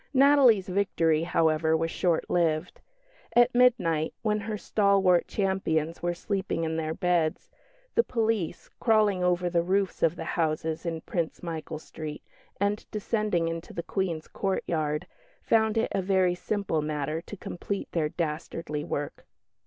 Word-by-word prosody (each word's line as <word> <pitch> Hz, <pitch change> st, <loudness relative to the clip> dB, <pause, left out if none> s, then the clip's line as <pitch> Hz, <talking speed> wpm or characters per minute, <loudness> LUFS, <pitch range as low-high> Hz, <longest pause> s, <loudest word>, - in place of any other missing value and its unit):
Natalie's 265 Hz, -7 st, +6 dB
victory, 170 Hz, -5 st, +1 dB
however, 160 Hz, -1 st, +2 dB
was 165 Hz, 0 st, -1 dB
short 175 Hz, -3 st, 0 dB
lived. 165 Hz, -1 st, 0 dB, 0.5 s
At 240 Hz, +1 st, +5 dB
midnight, 215 Hz, -11 st, +3 dB
when 210 Hz, -1 st, +1 dB
her 215 Hz, +1 st, -4 dB
stalwart 195 Hz, -4 st, +3 dB
champions 170 Hz, -5 st, -1 dB
were 175 Hz, 0 st, -1 dB
sleeping 195 Hz, -2 st, -2 dB
in 160 Hz, 0 st, -1 dB
their 160 Hz, 0 st, -2 dB
beds, 175 Hz, -3 st, 0 dB, 0.4 s
the 465 Hz, -, +4 dB
police, 225 Hz, -, -1 dB
crawling 210 Hz, -5 st, +3 dB
over 180 Hz, 0 st, +2 dB
the 170 Hz, -1 st, +2 dB
roofs 190 Hz, +2 st, 0 dB
of 165 Hz, +1 st, +3 dB
the -, -, -5 dB
houses 160 Hz, 0 st, -1 dB
in 165 Hz, -1 st, -3 dB
Prince 170 Hz, -1 st, -3 dB
Michael 160 Hz, -2 st, -5 dB
Street, 155 Hz, -1 st, -8 dB, 0.4 s
and 205 Hz, +1 st, 0 dB
descending 210 Hz, -5 st, 0 dB
into 165 Hz, 0 st, -5 dB
the 170 Hz, -, -4 dB
Queen's 170 Hz, -4 st, -2 dB
courtyard, 155 Hz, -6 st, -1 dB, 0.4 s
found 220 Hz, -1 st, +2 dB
it 225 Hz, -, +1 dB
a 195 Hz, -, 0 dB
very 185 Hz, -1 st, +2 dB
simple 180 Hz, -3 st, -1 dB
matter 150 Hz, +1 st, -2 dB
to 205 Hz, -, -10 dB
complete 195 Hz, +3 st, -5 dB
their 155 Hz, -3 st, 0 dB
dastardly 150 Hz, -1 st, -3 dB
work. 145 Hz, 0 st, -5 dB
175 Hz, 145 wpm, -27 LUFS, 160-200 Hz, 0.5 s, Natalie's